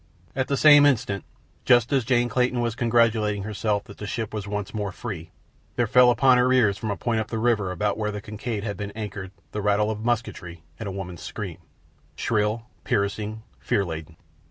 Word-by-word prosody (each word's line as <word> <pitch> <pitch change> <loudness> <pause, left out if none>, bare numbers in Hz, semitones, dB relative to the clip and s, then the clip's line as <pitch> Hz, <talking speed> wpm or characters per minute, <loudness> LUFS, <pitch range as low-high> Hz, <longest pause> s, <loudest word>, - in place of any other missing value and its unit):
At 130 0 0
the 140 - 0
same 145 -1 +8
instant, 115 -7 0 0.4
just 120 0 +4
as 135 -3 +3
Jane 120 0 +2
Clayton 125 +1 +1
was 120 -1 0
congratulating 115 -3 +2
herself 105 0 -1
that 100 - -14
the 105 - -5
ship 110 0 -3
was 105 -2 -4
once 105 -1 -4
more 105 -3 -2
free, 90 -6 -6 0.5
there 120 - +2
fell 125 +2 +6
upon 130 0 +5
her 125 +1 +3
ears 115 -6 +4
from 110 +2 -5
a 100 - -2
point 115 -2 0
up 110 - -2
the 115 - -4
river 110 -4 +1
about 105 +4 -1
where 105 -1 0
the 105 0 -4
Kincaid 105 +1 -5
had 100 -2 -4
been 100 -1 -4
anchored 105 -3 -5 0.2
the 105 - -3
rattle 105 +1 +2
of 110 0 -5
musketry 105 -8 -3 0.2
and 110 - -5
a - - -3
woman's 90 -3 -6
scream—shrill, 105 +3 -4 0.2
piercing, 105 +2 -1 0.2
fear 100 - 0
laden. 80 -1 -7
105 Hz, 195 wpm, -25 LUFS, 100-120 Hz, 0.5 s, same